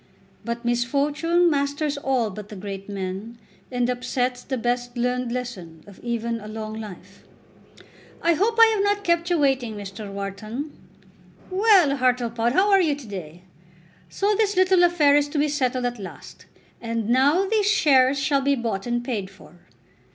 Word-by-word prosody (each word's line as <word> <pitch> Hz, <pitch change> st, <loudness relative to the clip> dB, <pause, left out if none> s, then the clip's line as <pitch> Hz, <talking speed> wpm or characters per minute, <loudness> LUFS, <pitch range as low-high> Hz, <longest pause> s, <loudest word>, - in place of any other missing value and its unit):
But 235 Hz, +1 st, -5 dB
misfortune 285 Hz, +8 st, +1 dB
masters 285 Hz, +1 st, -1 dB
all 265 Hz, -6 st, 0 dB
but 210 Hz, +1 st, -9 dB
the 210 Hz, -, -8 dB
great 195 Hz, 0 st, -7 dB
men, 200 Hz, +4 st, -5 dB, 0.3 s
and 245 Hz, -1 st, 0 dB
upsets 250 Hz, 0 st, -2 dB
the 260 Hz, 0 st, -4 dB
best 245 Hz, +1 st, -2 dB
learned 250 Hz, 0 st, -1 dB
lesson 195 Hz, -11 st, -6 dB
of 200 Hz, -2 st, -15 dB
even 235 Hz, -1 st, -3 dB
a 210 Hz, -, -10 dB
long 215 Hz, 0 st, -6 dB
life. 200 Hz, -3 st, -10 dB, 0.9 s
"I 340 Hz, -, +3 dB
hope 435 Hz, +7 st, 0 dB
I 455 Hz, -, +10 dB
have 405 Hz, -2 st, +1 dB
not 405 Hz, 0 st, +1 dB
kept 340 Hz, -1 st, +1 dB
you 350 Hz, -, +2 dB
waiting, 265 Hz, -6 st, +1 dB
Mr. 200 Hz, 0 st, -8 dB
Wharton. 215 Hz, +8 st, -5 dB, 0.8 s
Well, 375 Hz, -8 st, +4 dB
Hartlepod, 240 Hz, -2 st, +1 dB
how 395 Hz, +6 st, +3 dB
are 390 Hz, -1 st, +6 dB
you 310 Hz, -5 st, +1 dB
to 280 Hz, -2 st, -11 dB
day? 180 Hz, -4 st, -8 dB, 0.7 s
So 405 Hz, +2 st, 0 dB
this 410 Hz, -1 st, +1 dB
little 370 Hz, 0 st, +4 dB
affair 320 Hz, -5 st, +4 dB
is 290 Hz, 0 st, +2 dB
to 295 Hz, -, -4 dB
be 295 Hz, +1 st, +2 dB
settled 255 Hz, -3 st, -1 dB
at 245 Hz, -2 st, -3 dB
last, 195 Hz, -, -11 dB, 0.3 s
and 230 Hz, -2 st, -3 dB
now 280 Hz, +10 st, +3 dB
these 420 Hz, 0 st, +1 dB
shares 270 Hz, -7 st, +4 dB
shall 275 Hz, 0 st, +1 dB
be 280 Hz, +1 st, +2 dB
bought 230 Hz, -4 st, -3 dB
and 240 Hz, 0 st, -1 dB
paid 215 Hz, -7 st, -3 dB
for." 195 Hz, -, -17 dB
250 Hz, 165 wpm, -23 LUFS, 220-295 Hz, 0.9 s, I